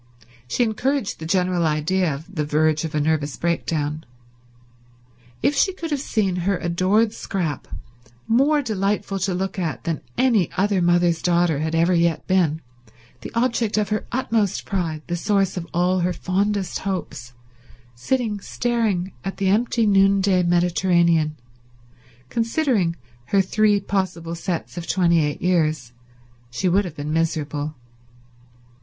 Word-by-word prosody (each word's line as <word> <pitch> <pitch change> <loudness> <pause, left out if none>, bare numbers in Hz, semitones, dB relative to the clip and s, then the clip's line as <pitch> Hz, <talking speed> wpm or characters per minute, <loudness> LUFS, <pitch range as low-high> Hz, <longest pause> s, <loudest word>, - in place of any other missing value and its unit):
She 245 - +1
encouraged 245 +2 -1
the 160 - -6
general 180 -1 +1
idea 160 +3 +1
of 160 +7 -8
the 155 -5 -1
verge 155 +1 +1
of 160 -1 -4
a - - +2
nervous 150 -1 0
breakdown. 160 -2 -1 1.4
If 285 - +3
she 380 - +2
could 330 -3 -6
have 290 - 0
seen 200 -9 0
her 180 +2 0
adored 185 +6 +1
Scrap, 170 -12 -3 0.6
more 285 +6 +3
delightful 200 -3 -1
to 190 -1 -1
look 190 +1 -3
upon 170 -3 -2
than 165 -2 -2 0.2
any 235 -8 +3
other 195 0 +2
mother's 175 -1 +2
daughter 175 -4 +2
had 160 +1 -1
ever 170 +2 +3
yet 170 -2 +1
been, 170 -4 +1 0.6
the - - -8
object 230 -3 +1
of 210 -1 +1
her 215 0 -2
utmost 225 -6 0
pride, 165 -5 -2
the 175 - -2
source 195 +1 +1
of 175 -2 -5
all 180 +2 +1
her 180 +1 0
fondest 195 +2 -1
hopes, 175 -10 -5 0.6
sitting 210 - -1
staring 215 -5 -1
at 195 - -5
the 195 -1 +1
empty 230 +3 +2
noonday 195 -2 +4
Mediterranean 175 -2 +2 0.9
considering 230 - +1 0.3
her 195 - +2
three 210 +1 +2
possible 185 -4 -2
sets 170 +1 -4
of 170 - -8
twenty 170 -3 +3
eight 150 0 -3
years, 155 -8 +1 0.6
she 125 +10 -2
would 195 +3 +3
have 170 -4 -7
been 150 +1 -4
miserable. 155 -2 -1
180 Hz, 140 wpm, -22 LUFS, 165-205 Hz, 1.4 s, noonday